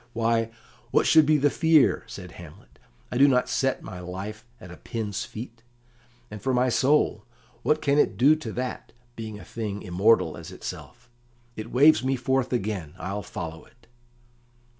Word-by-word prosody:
"Why, 115 Hz, 0 st, +1 dB, 0.4 s
what -, -, +2 dB
should 160 Hz, -2 st, +6 dB
be 155 Hz, 0 st, +5 dB
the 145 Hz, 0 st, +2 dB
fear?" 160 Hz, -3 st, +3 dB
said -, -, -9 dB
Hamlet. -, -, -14 dB, 0.3 s
"I 125 Hz, -, -1 dB
do 140 Hz, -, +7 dB
not 125 Hz, -2 st, +2 dB
set 135 Hz, +1 st, 0 dB
my 95 Hz, -2 st, -8 dB
life 95 Hz, +5 st, -7 dB, 0.2 s
at 90 Hz, -, -11 dB
a 90 Hz, -, -10 dB
pin's 105 Hz, -4 st, -4 dB
fee; 115 Hz, +3 st, -8 dB, 0.8 s
and 105 Hz, -1 st, -8 dB
for 130 Hz, -1 st, 0 dB
my 125 Hz, +1 st, +2 dB
soul, 130 Hz, -4 st, +2 dB, 0.4 s
what 155 Hz, +1 st, +1 dB
can 145 Hz, -1 st, +3 dB
it 95 Hz, -, +2 dB
do 140 Hz, +7 st, +6 dB
to 120 Hz, -8 st, -6 dB
that, 125 Hz, 0 st, -5 dB, 0.2 s
being 110 Hz, -2 st, -7 dB
a -, -, -12 dB
thing 105 Hz, -3 st, -5 dB
immortal 95 Hz, +6 st, +2 dB
as -, -, -9 dB
itself? 125 Hz, +1 st, -9 dB, 0.5 s
It 110 Hz, +1 st, -7 dB
waves 145 Hz, +3 st, +5 dB
me 135 Hz, +1 st, +1 dB
forth 130 Hz, +1 st, 0 dB
again. 100 Hz, -9 st, -3 dB
I'll 95 Hz, +3 st, -4 dB
follow 85 Hz, -6 st, -7 dB
it." 115 Hz, 0 st, -25 dB
115 Hz, 170 wpm, -26 LUFS, 105-135 Hz, 0.8 s, do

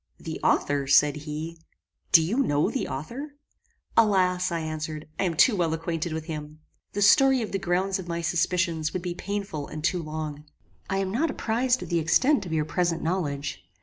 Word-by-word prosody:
"The -, -, -6 dB
author!" 145 Hz, -1 st, +1 dB
said 145 Hz, +2 st, +5 dB
he; 155 Hz, +2 st, -6 dB, 0.5 s
"Do 165 Hz, -, +8 dB
you 195 Hz, +10 st, -1 dB
know 150 Hz, -, +2 dB
the -, -, -2 dB
author?" 255 Hz, -, -6 dB, 0.6 s
"Alas!" 185 Hz, -4 st, +3 dB
I 170 Hz, -, -1 dB
answered, 155 Hz, -1 st, -5 dB
"I -, -, +2 dB
am 170 Hz, -3 st, -1 dB
too 220 Hz, +8 st, +5 dB
well 165 Hz, -4 st, +1 dB
acquainted 165 Hz, 0 st, -3 dB
with 160 Hz, 0 st, -4 dB
him. 155 Hz, -1 st, -7 dB, 0.3 s
The 205 Hz, -, +1 dB
story 265 Hz, +4 st, +5 dB
of 215 Hz, -, -6 dB
the 195 Hz, -, -1 dB
grounds 190 Hz, +2 st, 0 dB
of 180 Hz, -, -7 dB
my 170 Hz, 0 st, -2 dB
suspicions 170 Hz, -1 st, 0 dB
would 180 Hz, -, -3 dB
be 175 Hz, -1 st, -2 dB
painful 195 Hz, -6 st, -4 dB
and 155 Hz, 0 st, -7 dB
too 175 Hz, +1 st, +1 dB
long. 155 Hz, -1 st, -5 dB, 0.4 s
I 195 Hz, -, 0 dB
am 195 Hz, -1 st, -1 dB
not 300 Hz, +10 st, +1 dB
apprized 245 Hz, +3 st, 0 dB
of -, -, -9 dB
the 170 Hz, -1 st, +2 dB
extent 205 Hz, -, +3 dB
of -, -, -7 dB
your 155 Hz, -1 st, +1 dB
present 170 Hz, 0 st, 0 dB
knowledge. 145 Hz, -, -2 dB
170 Hz, 190 wpm, -26 LUFS, 155-195 Hz, 0.6 s, Do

